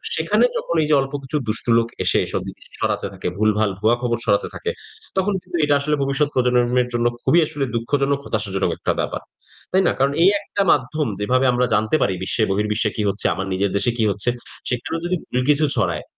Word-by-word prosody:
সেখানে - - +2
যখন 170 - -3
এই - - -1
যে 150 - +5
অল্প 135 +1 -5
কিছু 135 +3 -2
দুষ্ট 110 +1 -3
লোক 115 0 +2 0.2
এসে - - +2
এসব - - -3
জিনিস - - -10
সরাতে - - -1
থাকে, - - -5
ভুলভাল 110 0 +2
ভুয়া 110 +3 +3
খবর 120 -1 0
সরাতে 100 -3 +2
থাকে, 455 - -2 0.5
তখন 195 +2 +2
কিন্তু 175 - -5
এটা 145 -1 +3
আসলে 150 +2 0
ভবিষ্যৎ 140 +2 +1
প্রজন্মের 125 -1 +3
মের 125 -1 +3
জন্য 120 0 0 0.2
খুবই 170 - +4
আসলে 145 -3 -3
দুঃখজনক 140 +4 0
হতাশাজনক 100 -3 -1
একটা - - -1
ব্যাপার। - - -2 0.5
তাই 190 - +4
না? - - +4
কারণ 140 +1 +2
এই 185 - +7
একটা 200 - -3
মাধ্যম 135 +4 +1
যেভাবে 130 +6 +2
আমরা 125 0 +2
জানতে 110 +6 +2
পারি 95 - +2
বিশ্বে 110 +4 0
বহির্বিশ্বে 105 +2 0
কি - - 0
হচ্ছে, 100 - -4
আমার 95 - -4
নিজের 95 +1 0
দেশে 120 +4 +1
কি 115 - +1
হচ্ছে, 100 +4 -1 0.4
সেখানেও 125 +7 -2
যদি 180 +1 0
ভুল 125 - -2
কিছু 150 +1 +4
ছড়ায়, - - 0
125 Hz, 210 wpm, -21 LUFS, 110-145 Hz, 0.5 s, এই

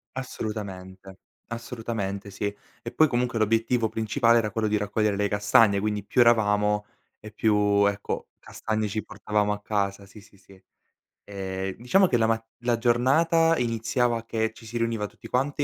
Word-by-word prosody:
Assolutamente, 95 -6 -7 0.3
assolutamente, 115 -4 -5
sì. 100 +1 -5 0.4
E 115 - -5
poi 155 - +4
comunque 120 -3 -1
l'obiettivo 115 +1 +1
principale 115 +1 +2
era 110 -2 0
quello 110 -1 -1
di 105 0 +1
raccogliere 105 0 0
le 100 +1 0
castagne, 105 0 +4
quindi 105 -1 -2
più 125 +4 +2
eravamo 105 -3 +3 0.3
e 105 - -11
più, 105 -2 +2
ecco, 100 0 -3
castagne 110 -1 -3
ci 110 +1 -3
portavamo 105 0 -1
a 105 - -6
casa, 100 -1 -2
sì, 100 +2 -15
sì, 100 - -21
sì. 95 0 -19 0.6
Ehm, 95 -1 -5
diciamo 185 +11 +3
che 120 - +2
la 110 -1 +2
mat 115 0 0
la 120 -1 0
giornata 160 +8 +3
iniziava 115 0 0
che 110 -1 -1
ci 115 - -16
si 120 +2 -5
riuniva 115 -2 -1
tutti - - -14
quanti, 140 +3 0
110 Hz, 160 wpm, -26 LUFS, 105-115 Hz, 0.6 s, poi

